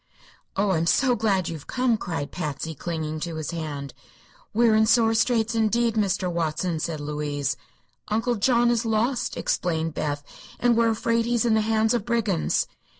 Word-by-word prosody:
"Oh, 195 0 +1
I'm 165 -2 +1
so 255 +6 +3
glad 200 -5 +1
you've 160 -4 -6
come!" 250 -2 +1
cried 165 -9 -4
Patsy, 160 -2 -4
clinging 155 0 -4
to 165 0 -4
his 155 +1 -4
hand. 145 -5 -5 0.6
"We 235 +2 +3
are 220 - +4
in 220 0 +4
sore 225 -1 +4
straits, 225 0 +2
indeed, 230 +1 +2
Mr. 195 -3 0
Watson," 170 0 -1
said 155 -1 -3
Louise. 145 -2 -2 0.5
"Uncle 225 +3 0
John 240 +2 +3
is 235 -1 +1
lost," 230 +3 0
explained 165 -2 -1
Beth, 145 -1 -2 0.4
"and 245 -1 +3
we're 230 0 +3
afraid 230 +1 +1
he 240 +1 0
is 235 - +2
in 230 - +3
the 220 - +3
hands 220 +1 +2
of 235 -4 0
brigands." 220 -7 +1
210 Hz, 175 wpm, -25 LUFS, 160-230 Hz, 0.6 s, are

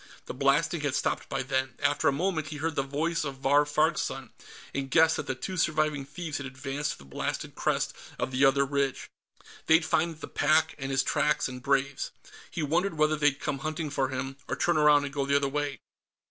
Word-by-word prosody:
The - - -6
blasting 145 +5 +2
had 145 -2 -1
stopped - - -1
by 135 -1 -1
then; 130 0 -1
after 145 0 +1
a - - +5
moment, 160 +1 -1
he 155 - -6
heard 160 +2 -1
the - - +2
voice 155 +5 -1
of 140 -2 -4
Vahr 140 +2 +3
Farg's 155 +2 +2
son, 135 -4 -5 0.4
and 135 -1 -3
guessed 160 +2 +5
that - - -4
the 130 - -1
two 185 +8 -5
surviving 155 -3 +1
thieves 155 +1 -5
had 140 - -5
advanced 135 +2 -3
to - - -13
the 70 - -15
blasted 70 - -4
crest - - 0 0.2
of 130 - -2
the 130 +2 +1
other 140 0 +5
ridge. 140 -1 -2 0.6
They'd 160 0 +5
find 165 -2 0
the - - -7
pack, 160 +1 +2
and 135 0 -4
his 135 -1 +2
tracks 150 +2 +1
and 125 -1 -8
Brave's. 140 0 0 0.4
He 160 - -3
wondered 170 +5 +1
whether 155 0 +3
they'd 145 -2 +2
come 145 -3 -2
hunting 155 +1 -3
for 135 -2 0
him, 135 +1 -4
or - - -2
turn 170 -2 +1
around 150 -1 +5
and 140 - -6
go 140 - 0
the 140 - +2
other 140 0 +3
way. 145 0 -3
145 Hz, 215 wpm, -28 LUFS, 135-155 Hz, 0.6 s, a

